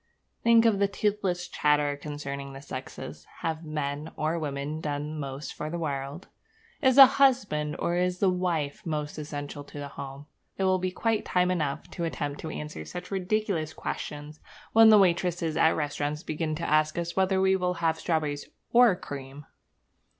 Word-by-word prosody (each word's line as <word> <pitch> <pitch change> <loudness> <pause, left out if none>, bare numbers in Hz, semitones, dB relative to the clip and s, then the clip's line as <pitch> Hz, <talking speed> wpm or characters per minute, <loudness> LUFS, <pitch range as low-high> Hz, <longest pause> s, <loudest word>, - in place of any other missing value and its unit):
Think 230 0 +5
of 215 -4 +4
the 200 - +4
toothless 200 -3 -1
chatter 150 -1 +2
concerning 140 -1 -6
the 135 - -9
sexes. 130 -2 -8
Have 160 0 -2
men 150 0 -3
or 160 +2 -1
women 145 +1 -3
done 150 +1 -3
most 135 0 -5
for 150 - -5
the 170 - -3
world? 145 0 -4 0.5
Is 260 -3 +4
the 270 -1 +12
husband 245 - +2
or 170 - 0
is 180 0 +1
the 195 - +2
wife 175 -6 -1
most 150 -2 -3
essential 145 -1 -6
to 145 - -11
the 145 -1 -5
home? 140 +1 -8 0.3
It 195 - -1
will 185 -1 +3
be 185 0 -1
quite 225 +3 0
time 180 0 +2
enough 150 -6 -2
to 170 - -4
attempt 145 -3 -3
to 160 - -5
answer 150 0 -6
such 180 +1 -8
ridiculous 190 -4 -1
questions 150 +1 -5 0.3
when 225 0 +8
the 215 - +8
waitresses 175 -3 +2
at 160 - +5
the - - 0
restaurants 150 +1 -2
begin 155 0 -2
to 170 +2 -3
ask 155 +1 +2
us 170 0 -3
whether 190 0 +2
we 190 0 +4
will 180 -1 0
have 165 -1 0
strawberries 150 -3 -1 0.2
or 240 -5 +7
cream! 140 -2 -8
160 Hz, 175 wpm, -28 LUFS, 145-185 Hz, 0.5 s, the